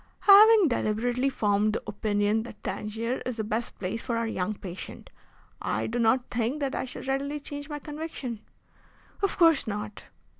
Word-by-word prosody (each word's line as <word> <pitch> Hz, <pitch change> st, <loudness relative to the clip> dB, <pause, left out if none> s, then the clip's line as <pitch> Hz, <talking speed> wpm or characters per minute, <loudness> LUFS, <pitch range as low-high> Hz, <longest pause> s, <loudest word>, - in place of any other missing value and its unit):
"Having 415 Hz, -2 st, +8 dB
deliberately 240 Hz, +3 st, 0 dB
formed 210 Hz, -3 st, +1 dB
the -, -, -3 dB
opinion 210 Hz, +1 st, 0 dB
that 220 Hz, -2 st, -11 dB
Tangier 225 Hz, +4 st, -3 dB
is 250 Hz, -, -3 dB
the 220 Hz, -, -1 dB
best 220 Hz, +3 st, -3 dB
place 195 Hz, +4 st, -3 dB
for 235 Hz, -3 st, -2 dB
our 230 Hz, -, 0 dB
young 215 Hz, -2 st, -2 dB
patient, 185 Hz, -2 st, -9 dB, 0.5 s
I -, -, -1 dB
do 240 Hz, +2 st, -2 dB
not 240 Hz, +2 st, +2 dB
think 240 Hz, +5 st, -1 dB
that 275 Hz, -2 st, -1 dB
I -, -, -2 dB
shall 255 Hz, -, -8 dB
readily 275 Hz, +2 st, -2 dB
change 285 Hz, +1 st, -7 dB
my 295 Hz, -, -4 dB
conviction." 295 Hz, -6 st, -6 dB, 0.8 s
"Of 395 Hz, -, 0 dB
course 330 Hz, -7 st, +5 dB
not." 210 Hz, 0 st, -5 dB
235 Hz, 165 wpm, -27 LUFS, 215-285 Hz, 0.8 s, Having